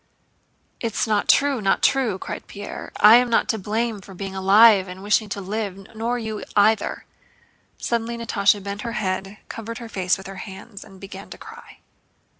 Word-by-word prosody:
"It's 230 -3 -1
not 210 -2 0
true, 275 -4 +4
not 195 -1 +1
true!" 250 -8 +2
cried - - -7
Pierre. 205 0 -8
"I 215 +3 +9
am 250 0 +2
not 230 - +2
to 220 - 0
blame 220 +1 -2
for 195 0 -13
being 195 +1 -6
alive 195 +1 +6
and 185 +1 -9
wishing 210 +1 +1
to 200 - -4
live—nor 215 +3 -4
you 220 -2 -5
either." 210 +1 +2 0.7
Suddenly 235 0 -2
Natásha 205 -3 +1
bent 200 +1 -5
her 235 0 -4
head, 195 -2 -3
covered 225 +1 -7
her 235 -2 -8
face 185 -3 0
with 190 - -12
her 195 0 -8
hands, 200 +1 -10
and 195 -2 -15
began 195 0 -10
to - - -9
cry. - - -13
210 Hz, 175 wpm, -23 LUFS, 195-230 Hz, 0.7 s, I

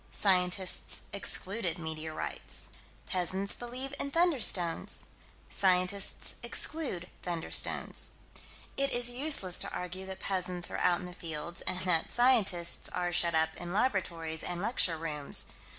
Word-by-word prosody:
Scientists 185 -1 +1
excluded 195 -2 +1
meteorites. 160 -1 -3 0.4
Peasants 190 +2 -1
believe 255 +3 -3
in 280 - -2
"thunderstones." 275 - +3 0.4
Scientists 185 +1 +1
exclude 240 - -2
"thunderstones." 170 -2 +1 0.6
It 275 0 +3
is 245 0 +2
useless 245 - +3
to - - +1
argue 185 +1 -5
that 190 0 -7
peasants 180 -2 -1
are - - -3
out 175 -1 +2
in - - -7
the 180 - -8
fields, 170 0 -5
and 185 0 0
that 170 -2 +1
scientists 210 -9 +2
are 175 -1 -2
shut 170 -1 +3
up 160 0 +3
in 175 0 -6
laboratories 170 -8 -1
and 175 -1 -3
lecture 190 -5 +2
rooms. 150 -3 -1
180 Hz, 125 wpm, -31 LUFS, 170-210 Hz, 0.6 s, thunderstones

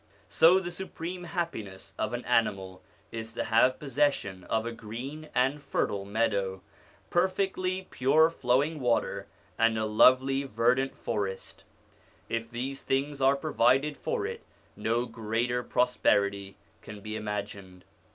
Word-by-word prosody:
So 175 +3 +6
the 175 -2 -5
supreme 180 -1 -6
happiness 160 - -5
of 110 - -2
an 120 0 -4
animal 100 -6 0 0.3
is 115 0 -6
to - - -2
have 115 +3 +3
possession 135 -10 -1
of 110 0 -1
a 115 - -3
green 120 +8 -7
and 135 +4 +2
fertile 100 -7 -1
meadow, 100 -3 -1 0.5
per 175 +2 +3
fectly 185 -1 -2
pure 155 +5 +4
flowing 145 +2 +1
water, 120 -3 0 0.3
and 115 0 +3
a 110 - 0
lovely, 130 +5 +4
verdant 125 +1 +1
forest 100 -4 -4 0.6
If 115 0 -2
these 130 +3 -4
things 140 +1 -1
are 135 +1 +5
provided 140 0 +2
for - - -2
it, - - -5 0.3
no 115 +2 0
greater 115 +2 -1
pro 125 0 +2
sperity 100 -5 +1 0.3
can 105 -1 -10
be 110 +1 -5
imagined. 100 -3 -6
120 Hz, 135 wpm, -29 LUFS, 110-140 Hz, 0.6 s, So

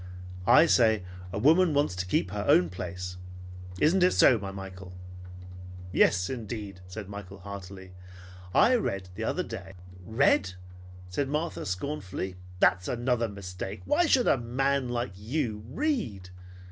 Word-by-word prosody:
I 155 - +8
say 110 - +4 0.3
a 95 - -4
woman 160 - +4
wants 145 -10 +1
to 90 0 -3
keep 90 - +1
to - - -9
her 100 - -2
own 90 0 +5
place. 90 0 -6 0.6
Isn't 175 +5 +3
it 180 +1 +5
so, 120 -4 +5
my 100 -1 -5
Michael?" 95 -1 -9 1.0
"Yes, 90 +1 +3
indeed," 105 -6 -6
said 100 +2 -7
Michael 100 -1 -8
heartily. 95 -1 -9 0.6
"I 245 - +5
read 95 - -3
the 110 +5 -5
other 180 - -1
day 95 - -8 0.2
" 90 0 -16
"Read!" 110 -4 +2 0.5
said 115 +10 -2
Martha 150 - -2
scornfully. 95 -3 -4 0.2
"That's 95 0 +3
another 120 -1 0
mistake. 95 0 -7
Why 325 +4 +3
should 260 -5 +3
a 135 - +4
man 135 +2 0
like 120 -4 -2
you 110 0 -3
read? 125 - -2
105 Hz, 145 wpm, -28 LUFS, 95-135 Hz, 1.0 s, I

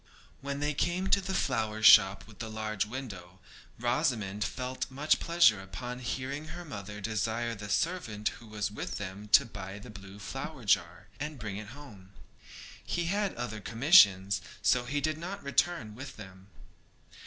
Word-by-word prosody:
When 140 +1 -4
they 150 +1 0
came 175 +6 0
to 200 - +5
the 110 - -1
shop 100 -3 +7
with 105 -2 -16
the 115 - -5
large 110 -2 -2
window 100 -8 -7 0.4
Rosamond 120 -5 0
felt 125 +4 -4
much 145 +4 +1
pleasure 165 - +4
upon 120 +6 -6
hearing 130 +4 -4
her 175 +1 -8
mother 105 - -7
desire 115 +2 -1
the 105 -2 -8
servant 115 - 0
who 115 - -13
was 105 -2 -3
with 105 - -5
them 100 +1 -6
to - - +8
buy 100 -3 -8
the 105 - -10
blue 100 -1 -11 0.5
jar, 85 -2 +1
and 150 +1 -4
bring 105 -4 -5
it 105 0 -7
home. 100 -10 -13 0.7
He 170 0 -2
had 205 -1 0
other 115 -3 -5
commissions, 100 - +5 0.2
so 125 -1 +3
he 145 +3 -1
did 155 +1 -1
not 185 +4 -6
return 140 -5 0
with 130 +4 -9
them. 95 -2 -12
115 Hz, 155 wpm, -30 LUFS, 100-140 Hz, 0.7 s, to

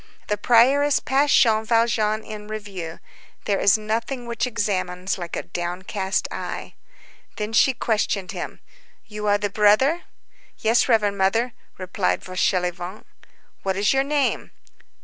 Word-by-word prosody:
The 210 - +2
prioress 265 +7 +4
passed 280 +2 +3
Jean 220 -2 +3
Valjean 220 -1 +1
in 210 -1 -8
review. 200 -6 -6 0.5
There 200 -1 +1
is 200 - +5
nothing 230 +4 -3
which 235 +1 -2
examines 190 -5 -2
like 175 -1 -5
a - - -3
downcast 185 +3 -3
eye. - - -6 0.6
Then 215 0 -4
she 260 +3 +4
questioned 210 -5 -1
him:— - - -6 0.4
"You 210 -1 -5
are 205 0 +4
the 205 -1 -3
brother?" 215 - +3 0.5
"Yes, 230 +3 +2
reverend 205 -4 +2
Mother," 225 +6 +1 0.2
replied 180 - -1
Fauchelevent. 180 +1 -2 0.6
"What 190 -1 -2
is 205 +5 +2
your 270 0 +2
name?" 285 0 0
210 Hz, 130 wpm, -23 LUFS, 190-235 Hz, 0.6 s, is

